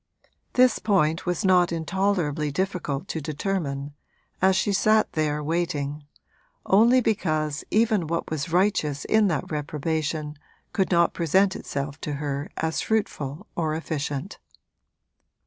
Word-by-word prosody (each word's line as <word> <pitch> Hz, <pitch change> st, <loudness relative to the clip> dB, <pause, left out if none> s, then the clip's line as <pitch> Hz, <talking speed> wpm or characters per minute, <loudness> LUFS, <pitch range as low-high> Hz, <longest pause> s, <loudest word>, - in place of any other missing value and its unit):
This 255 Hz, -2 st, +4 dB
point 175 Hz, -5 st, +1 dB
was 180 Hz, +4 st, 0 dB
not 180 Hz, -2 st, +4 dB
intolerably 165 Hz, -3 st, 0 dB
difficult 175 Hz, -2 st, -2 dB
to 160 Hz, -, -3 dB
determine, 145 Hz, -2 st, -3 dB, 0.5 s
as 190 Hz, 0 st, +4 dB
she 205 Hz, -, +1 dB
sat 215 Hz, +2 st, +3 dB
there 150 Hz, -1 st, 0 dB
waiting, 150 Hz, -3 st, -2 dB, 0.6 s
only 235 Hz, +6 st, +5 dB
because 155 Hz, -9 st, 0 dB
even 215 Hz, -6 st, +2 dB
what 170 Hz, 0 st, -3 dB
was 155 Hz, +1 st, -3 dB
righteous 165 Hz, -6 st, +1 dB
in 215 Hz, -1 st, +3 dB
that 155 Hz, -5 st, -2 dB
reprobation 150 Hz, 0 st, -2 dB, 0.3 s
could 190 Hz, -, +1 dB
not 170 Hz, -2 st, +3 dB
present 190 Hz, +4 st, +2 dB
itself 140 Hz, +1 st, -5 dB
to 150 Hz, -, -3 dB
her 140 Hz, 0 st, -3 dB
as 160 Hz, 0 st, -1 dB
fruitful 190 Hz, -6 st, -2 dB
or 155 Hz, -2 st, 0 dB
efficient. 155 Hz, +1 st, -4 dB
160 Hz, 125 wpm, -25 LUFS, 150-190 Hz, 0.6 s, only